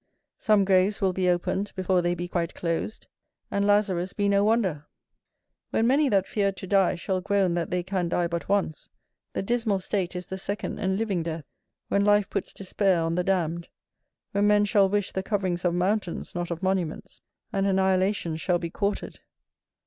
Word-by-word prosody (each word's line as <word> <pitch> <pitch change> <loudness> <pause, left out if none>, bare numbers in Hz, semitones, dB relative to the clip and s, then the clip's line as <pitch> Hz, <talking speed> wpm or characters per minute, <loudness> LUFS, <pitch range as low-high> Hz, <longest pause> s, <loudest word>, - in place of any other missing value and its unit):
Some 210 -2 +3
graves 190 +1 +3
will 190 -2 +1
be 185 0 +1
opened 180 +3 -1
before 185 -1 +1
they 175 0 0
be 175 0 -4
quite 170 -1 -2
closed, 170 +5 -3 0.5
and 200 0 +1
Lazarus 195 -3 +2
be 205 -1 0
no 200 0 +3
wonder. 195 -9 +1 0.8
When 225 - +1
many 275 +4 +3
that 195 -3 +2
feared 200 -2 -1
to - - -7
die, 190 -1 +3
shall 185 +2 -2
groan 195 -2 +1
that 170 -1 -1
they 180 -1 -1
can 185 -2 -1
die 175 0 +1
but 170 +1 -4
once, 195 -6 -1 0.4
the - - -2
dismal 230 -2 +1
state 185 -1 -2
is 180 0 -4
the 190 +2 -6
second 200 +2 -4
and 190 -2 0
living 205 -5 -1
death, 160 -2 -4 0.4
when 200 - +2
life 205 0 +3
puts - - -3
despair 195 -1 0
on 165 0 -1
the 180 +1 0
damned; 170 -3 -1 0.6
when 200 +1 +2
men 210 0 +4
shall 200 -2 +3
wish 205 -1 0
the 190 - -2
coverings 190 -3 -1
of 175 -1 +2
mountains, 185 0 -1
not 175 -1 -3
of 170 +1 -5
monuments, 185 -4 -2 0.3
and 195 -1 +1
annihilations 190 -3 +1
shall 180 -2 +2
be 170 -1 -5
courted. 200 +2 -3
190 Hz, 185 wpm, -26 LUFS, 175-200 Hz, 0.8 s, men